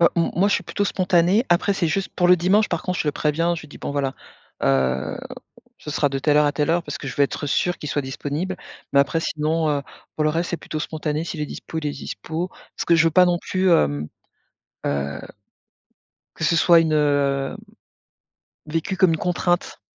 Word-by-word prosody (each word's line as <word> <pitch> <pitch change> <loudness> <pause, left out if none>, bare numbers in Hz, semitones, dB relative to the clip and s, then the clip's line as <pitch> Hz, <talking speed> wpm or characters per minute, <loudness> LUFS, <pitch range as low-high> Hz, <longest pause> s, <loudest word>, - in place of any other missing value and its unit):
Heu, 170 - +7
mmh, 170 - +2
moi 200 +3 +4
je - - +2
suis 185 - 0
plutôt 205 - -1
spontanée. 185 +3 +2
Après, 175 +4 +3
c'est 175 -3 0
juste 195 +4 -1
pour 175 -1 +2
le 180 - +7
dimanche, 195 +5 +3
par 170 - -2
contre, 180 -1 -2
je 150 - 0
le 145 - +1
préviens. 165 +3 +1
Je 165 - -7
lui 150 - -13
dis: - - -12
«Bon, - - -4
voilà, 140 -2 -1 0.5
heu, 65 -1 +1 0.6
ce 150 - -8
sera 145 0 +1
de 135 0 -2
telle 145 +2 +2
heure 150 - +5
à 145 - +1
telle 150 +1 0
heure», 170 +1 +2
parce - - -5
que 140 - -6
je 125 - -7
vais 140 - +5
être 145 - -4
sûre 175 +5 0
qu'il 150 - -6
soit 145 +1 -1
disponible. 145 +7 -4 0.4
Mais 140 - +6
après, 150 +4 +1
sinon, 155 0 0
heu, 145 -1 0 0.3
pour 155 - 0
le 155 - +3
reste, 165 +2 -1
c'est 175 - -1
plutôt 155 - -6
spontané. 155 0 -3
Si 170 - -5
il 150 - -3
est - - -2
dispo, 160 - -6
il 150 - -3
est - - 0
dispo. 160 +5 -5 0.3
Parce - - -3
que 170 - +5
je 165 - +4
veux 165 - +4
pas 180 +3 +6
non 175 -1 +2
plus, 185 0 0
hem, 75 - +2 0.8
heu, 70 0 -2 1.2
que - - -6
ce 160 +2 +3
soit 170 +1 +6
une, 160 -1 +1
heu, 140 -2 +1 1.1
vécu 165 +4 -2
comme 185 -3 +5
une - - 0
contrainte. 175 0 -1
160 Hz, 230 wpm, -22 LUFS, 145-175 Hz, 1.2 s, Heu